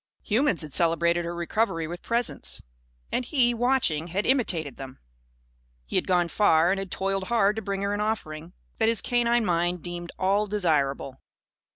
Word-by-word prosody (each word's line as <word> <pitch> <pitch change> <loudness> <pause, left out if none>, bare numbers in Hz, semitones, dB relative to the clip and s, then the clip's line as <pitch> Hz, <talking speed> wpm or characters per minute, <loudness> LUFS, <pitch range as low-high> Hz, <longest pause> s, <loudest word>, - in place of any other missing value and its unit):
Humans 225 - +1
had 150 -3 -9
celebrated 170 0 +2
her 170 0 -4
recovery 170 0 -1
with 175 +2 -7
presents. 235 +1 -1 0.5
And - - 0
he, 245 -2 +2
watching, 235 - +1
had 190 +4 -2
imitated 180 - 0
them. 135 -1 -9 0.9
He - - -6
had - - +1
gone 175 -2 +2
far 170 -3 +3
and 195 - 0
had 195 -1 -5
toiled 195 +1 -2
hard 210 -2 +2
to - - -2
bring 195 -1 -3
her 200 0 0
an 205 - -2
offering 170 -6 -3 0.3
that 225 0 +3
his 230 - +2
canine 240 -1 +1
mind 175 -1 0
deemed 175 -1 -6
all 200 +3 +1
desirable. 145 -9 0
190 Hz, 170 wpm, -26 LUFS, 170-220 Hz, 0.9 s, far